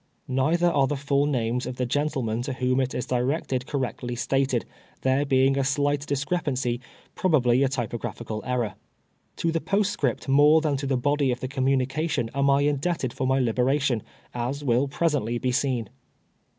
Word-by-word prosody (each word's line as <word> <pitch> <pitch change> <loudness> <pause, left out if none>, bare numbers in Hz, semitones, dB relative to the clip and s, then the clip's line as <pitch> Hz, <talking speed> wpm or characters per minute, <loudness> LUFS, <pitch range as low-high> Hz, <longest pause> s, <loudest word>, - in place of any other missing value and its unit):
Nei 135 +6 +2
ther 175 0 +3
are 140 -3 +3
the 145 - -1
full 140 +1 +1
names 125 -3 -1
of 125 - -4
the 125 - -1
gentlemen 125 -4 -1
to 130 +2 -3
whom 130 0 0
it 130 -1 -1
is 125 - -2
directed 130 0 -1
correctly 125 -3 -3
stated, 130 0 0 0.4
there 130 +2 +2
lacing 135 0 +3
a - - +2
slight 145 +1 0
dis 140 0 -1
crepancy, 135 -7 -1 0.4
i)ri>l)al)ly 135 -7 +3
a 135 - +2
typograpliical 115 -3 -4
err^r. 120 -5 -1 0.6
To 165 - 0
the 165 0 -1
postscript 195 - 0
more 145 +3 +6
than 155 -3 0
to 140 0 -3
the 135 -1 +1
body 145 +1 +1
of 125 - -2
the 130 - -3
communica 135 +3 0
tion 120 -7 -1
am 140 0 +2
I 140 0 +4
indebted 145 -2 0
for 130 - -2
my 130 +1 +2
liberation, 125 +1 +1 0.3
as 125 +4 -3
will 130 +1 +2
present 145 -1 0
ly 120 +2 -1
be 125 +1 -1
seen. 125 -4 0
135 Hz, 180 wpm, -25 LUFS, 125-145 Hz, 0.6 s, more